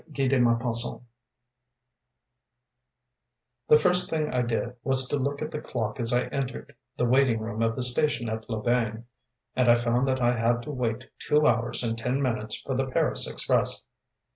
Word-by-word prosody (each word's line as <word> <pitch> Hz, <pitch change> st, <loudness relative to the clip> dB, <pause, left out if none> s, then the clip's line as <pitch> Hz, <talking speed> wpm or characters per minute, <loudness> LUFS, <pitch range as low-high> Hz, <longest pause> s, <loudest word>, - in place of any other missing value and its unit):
MADAME 135 Hz, -2 st, +2 dB
BAPTISTE 115 Hz, 0 st, 0 dB, 2.7 s
The 150 Hz, -, +7 dB
first 180 Hz, +3 st, +4 dB
thing 155 Hz, -3 st, -2 dB
I 125 Hz, -, +1 dB
did 120 Hz, +1 st, -2 dB
was 130 Hz, -1 st, +2 dB
to 145 Hz, -, 0 dB
look 140 Hz, +2 st, -2 dB
at 155 Hz, -, -6 dB
the 150 Hz, -, -5 dB
clock 110 Hz, -1 st, -4 dB
as 115 Hz, 0 st, +2 dB
I 125 Hz, 0 st, +1 dB
entered 135 Hz, -2 st, -5 dB, 0.2 s
the 125 Hz, -, +1 dB
waiting 125 Hz, -2 st, +2 dB
room 110 Hz, 0 st, -5 dB
of 115 Hz, 0 st, 0 dB
the 125 Hz, -, -1 dB
station 125 Hz, -1 st, +3 dB
at 110 Hz, +1 st, -5 dB
Loubain, 115 Hz, 0 st, -1 dB, 0.5 s
and 125 Hz, -2 st, +2 dB
I 120 Hz, -, +7 dB
found 120 Hz, +2 st, 0 dB
that 130 Hz, 0 st, 0 dB
I 120 Hz, -1 st, +2 dB
had 120 Hz, +1 st, 0 dB
to 150 Hz, -, -6 dB
wait 125 Hz, -3 st, -4 dB
two 150 Hz, 0 st, +2 dB
hours 120 Hz, +1 st, +1 dB
and 115 Hz, -1 st, -1 dB
ten 125 Hz, +4 st, -2 dB
minutes 110 Hz, -5 st, -1 dB
for 135 Hz, -, -4 dB
the 135 Hz, +1 st, -1 dB
Paris 130 Hz, -, +1 dB
express. -, -, 0 dB
120 Hz, 170 wpm, -26 LUFS, 115-135 Hz, 2.7 s, The